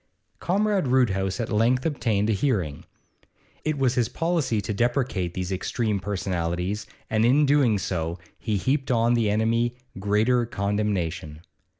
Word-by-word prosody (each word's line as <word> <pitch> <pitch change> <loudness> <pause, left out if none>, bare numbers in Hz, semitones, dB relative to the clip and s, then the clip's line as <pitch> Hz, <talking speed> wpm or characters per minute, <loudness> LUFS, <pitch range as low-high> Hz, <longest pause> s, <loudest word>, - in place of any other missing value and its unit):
Comrade 200 -2 +1
Roodhouse 100 -6 +1
at 115 0 -3
length 120 +4 +2
obtained 115 -9 0
a 110 - +2
hearing. 95 - -1 0.8
It 155 -1 -1
was 130 -3 +2
his 120 -3 +1
policy 165 -8 0
to 105 - -3
deprecate 120 -6 0
these 90 0 -3
extreme 105 +2 -1
personalities, 95 +1 -2 0.2
and 110 0 +1
in 135 +6 +4
doing 135 -6 +3
so 85 -3 -2 0.2
he 110 -3 -1
heaped 135 +6 0
on 120 -1 +3
the 115 -3 +2
enemy 115 +3 +1 0.2
greater 110 +5 +2
condemnation. 95 -7 -2
110 Hz, 135 wpm, -25 LUFS, 95-125 Hz, 0.8 s, in